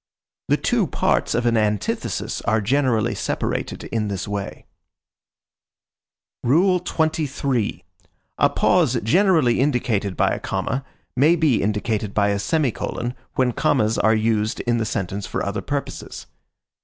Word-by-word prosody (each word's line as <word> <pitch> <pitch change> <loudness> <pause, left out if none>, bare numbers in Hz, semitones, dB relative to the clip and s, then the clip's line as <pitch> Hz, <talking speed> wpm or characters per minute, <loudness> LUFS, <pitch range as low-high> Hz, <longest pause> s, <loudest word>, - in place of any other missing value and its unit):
The - - +3
two - - +1
parts - - 0
of 120 +1 0
an 120 -1 +3
antithesis 105 -2 -1
are 110 +2 +1
generally 120 0 +1
separated - - -3
in 110 -2 -2
this 100 -1 -4
way. 100 -1 -5 1.8
XXIII. 155 - +1 0.5
A - - +5
pause - - +2
generally 160 - +3
indicated 115 - 0
by - - +3
a - - -2
comma 135 +4 -2 0.3
may 150 +7 +5
be 155 -8 +2
indicated 105 0 -1
by 105 -1 +3
a 100 0 0
semicolon 125 -1 -1 0.2
when 130 -1 +2
commas 110 -1 +1
are 110 +2 +4
used 110 -1 0
in 120 -1 0
the 110 - 0
sentence 100 -1 -3
for - - -3
other 100 0 -2
purposes. 140 +6 -5
115 Hz, 130 wpm, -22 LUFS, 105-140 Hz, 1.8 s, A